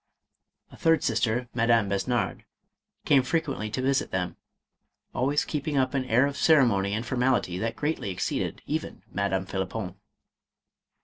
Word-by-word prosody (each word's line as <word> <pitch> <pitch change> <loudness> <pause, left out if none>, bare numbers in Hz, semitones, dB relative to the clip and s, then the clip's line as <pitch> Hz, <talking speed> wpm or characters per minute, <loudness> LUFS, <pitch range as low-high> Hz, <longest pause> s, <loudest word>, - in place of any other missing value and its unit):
A - - -13
third 165 0 +3
sister, 120 +1 0
Madame 115 -3 +3
Besnard, 110 +5 -1 0.6
came 140 -2 +5
frequently 140 -5 -2
to 130 +4 -3
visit 135 0 +1
them, 90 -1 -2 0.8
always 140 +4 +1
keeping 150 -1 -2
up 130 0 +2
an 135 -2 0
air 125 +2 +4
of 140 0 -2
ceremony 110 -11 +4
and 110 +2 -3
formality 125 -8 +1
that 115 +2 -2
greatly 145 -2 -2
exceeded 90 - -2
even - - -4
Madame 95 -1 0
Phlippon. 95 0 -4
120 Hz, 135 wpm, -27 LUFS, 100-135 Hz, 0.8 s, came